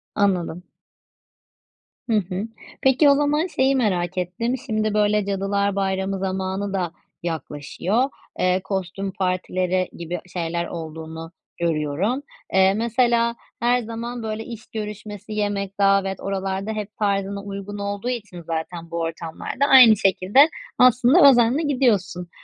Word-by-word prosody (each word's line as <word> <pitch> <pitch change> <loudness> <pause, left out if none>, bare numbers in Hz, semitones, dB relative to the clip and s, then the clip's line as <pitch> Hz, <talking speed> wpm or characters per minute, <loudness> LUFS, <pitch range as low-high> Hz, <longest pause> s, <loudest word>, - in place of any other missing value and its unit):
Anladım. 180 -3 0 1.5
Hı - - +2
hı. 190 +2 -2 0.3
Peki, 265 +2 +5
o 280 - +6
zaman 295 +4 +1
şeyi 270 -5 +2
merak 185 -7 0
ettim. 185 +8 -1
Şimdi, 215 -3 0
böyle, 210 -1 +2
Cadılar 200 0 0
Bayramı 190 0 -1
zamanı 190 +1 -2
da 180 -4 -1 0.3
yaklaşıyor. 170 - -2 0.4
Eee, 185 +1 +2
kostüm 190 0 -3
partileri 185 0 -1
gibi 170 +1 -4
şeyler 170 -1 -2
olduğunu 160 0 -7 0.3
görüyorum, 170 - 0 0.3
eee, 190 0 +5
mesela 235 +1 +2 0.2
her 245 +1 +2
zaman, 235 +1 -6
böyle, 220 0 -3
iş 230 -2 -9
görüşmesi, 210 -1 -7
yemek, 205 -2 -2
davet 195 -1 +2
oralarda 195 +1 -3
hep 215 -1 -6
tarzına 200 -1 -1
uygun 200 0 -6
olduğu 200 +3 -3
için 210 -8 -5
zaten 165 +1 -5
bu 170 - -2
ortamlar 165 0 -4
da, - - +6
aynı 255 -6 +8
şekilde, 195 - +4 0.3
aslında 255 +5 +6
özenle 245 +4 +4
gidiyorsun, 210 - +1
200 Hz, 125 wpm, -23 LUFS, 185-225 Hz, 1.5 s, aynı